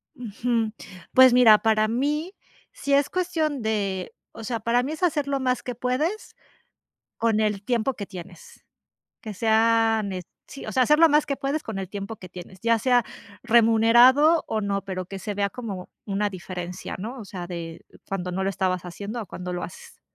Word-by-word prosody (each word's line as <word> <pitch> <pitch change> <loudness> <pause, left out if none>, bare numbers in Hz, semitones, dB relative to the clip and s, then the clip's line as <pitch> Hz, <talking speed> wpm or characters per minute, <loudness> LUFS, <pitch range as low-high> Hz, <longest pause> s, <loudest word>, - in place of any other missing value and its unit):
Ujú. 230 0 -2 0.4
Pues 260 -1 +8
mira, 235 -4 +7
para 215 -1 +2
mí 295 - -1 0.4
si 280 0 -3
es 280 0 +3
cuestión 320 -7 -1
de, 200 -4 -2 0.2
o 225 - -10
sea, 230 +1 -3
para 235 +2 +2
mí 290 +4 -3
es 315 - -7
hacer 300 -5 +1
lo 280 -1 0
más 255 -1 0
que 250 - -5
puedes 265 - -2 0.8
con 225 -2 +1
el 210 -2 0
tiempo 245 +2 0
que 200 -4 -6
tienes. 340 - -12 0.6
Que 215 -3 -7
sea 225 +1 +3
ne 190 -2 -4 0.2
sí, 275 - -10
o - - -5
sea, 260 - +3
hacer 300 +5 +4
lo 330 0 +7
más 300 0 +3
que 280 - -2
puedes 280 +3 -2
con 220 -3 -5
el 190 -1 -5
tiempo 200 +3 -6
que 185 - -11
tienes, 180 +1 -11
ya 230 +1 +2
sea 245 -2 +3 0.4
remunerado 240 +7 +5
o 220 - -1
no, 200 -1 -2
pero 185 -2 -5
que 195 0 -7
se 210 0 -4
vea 200 0 0
como 200 -6 -7 0.2
una 205 +1 0
diferencia, 180 -1 -6
¿no? 235 +7 -6
O 215 - -8
sea, 180 -3 -7
de 170 -2 -7 0.2
cuando 180 -2 -3
no 190 +2 -2
lo 195 - 0
estabas 185 -2 -1
haciendo 200 +6 -6
o - - -10
cuando 180 +1 -6
lo 175 0 -4
haces. 170 - -10
225 Hz, 195 wpm, -25 LUFS, 195-255 Hz, 0.8 s, Pues